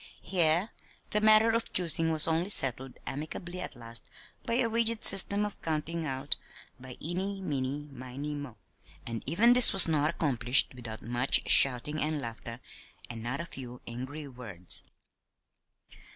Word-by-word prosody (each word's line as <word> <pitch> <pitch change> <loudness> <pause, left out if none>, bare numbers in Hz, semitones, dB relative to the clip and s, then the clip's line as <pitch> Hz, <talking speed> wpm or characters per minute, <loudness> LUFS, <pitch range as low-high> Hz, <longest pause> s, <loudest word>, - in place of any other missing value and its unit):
Here 175 +2 0 0.4
the 210 - 0
matter 215 +1 +3
of 230 0 -4
choosing 165 -2 +1
was 155 -1 +4
only 165 +4 -3
settled 130 - +1
amicably 175 +5 -8
at 180 - -8
last 115 -1 -12 0.4
by 230 - -2
a 245 -1 0
rigid 230 0 0
system 200 +1 +5
of 205 - -10
"counting 160 +1 -5
out" 135 +1 -3 0.4
by 125 -1 -12
"Eeny, 190 +5 -6
meany, 145 -4 -6
miny, 135 +3 -9
mo"; 145 -5 -10 0.5
and 115 -1 -7
even 215 - +2
this 250 0 +10
was 195 -3 +9
not 155 -2 -1
accomplished 135 -7 0
without 115 -3 -11
much 120 +3 -2
shouting 135 +4 +4
and 155 0 -3
laughter, 115 -1 -10 0.5
and 115 -1 -10
not 120 +7 -6
a - - -9
few 125 -6 -12
angry 130 +5 -10
words. 110 -9 -11
150 Hz, 150 wpm, -27 LUFS, 125-180 Hz, 0.5 s, this